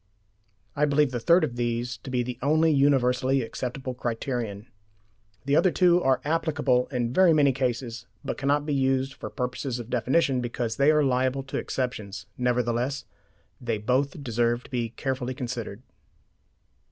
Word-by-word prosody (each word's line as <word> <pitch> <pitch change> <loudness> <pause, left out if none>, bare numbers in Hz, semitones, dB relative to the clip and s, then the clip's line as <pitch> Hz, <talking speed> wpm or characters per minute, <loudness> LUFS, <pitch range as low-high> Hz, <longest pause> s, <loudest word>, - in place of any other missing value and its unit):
I 150 - +3
believe 145 -1 +2
the 120 - -2
third 170 +9 +4
of 125 -6 -2
these 120 0 -2
to 115 - -10
be 125 -1 0
the 125 0 -6
only 155 +4 +3
universally 135 -2 +2
applicable 130 +2 -5
criterion. 115 -3 -3 0.8
The 140 +1 +2
other 185 - +5
two 180 0 +4
are 130 -4 +2
applicable 150 -5 +1
in 125 -3 -2
very 185 0 +5
many 145 -3 +4
cases, 120 -4 -3 0.2
but - - -2
cannot 145 +1 0
be 150 - -1
used 135 0 +1
for - - -7
purposes 125 0 -3
of 120 0 -8
definition 130 +2 +2
because 120 -1 -3
they 140 +2 +4
are 150 -1 +4
liable 130 0 +1
to 140 - -5
exceptions. 105 -8 -4
Nevertheless, 125 +2 0 0.6
they 115 -3 -1
both 135 +7 -1
deserve 120 0 0
to - - -16
be 120 -3 -1
carefully 130 +1 -3
considered. 120 -3 -5
130 Hz, 155 wpm, -26 LUFS, 120-140 Hz, 0.8 s, other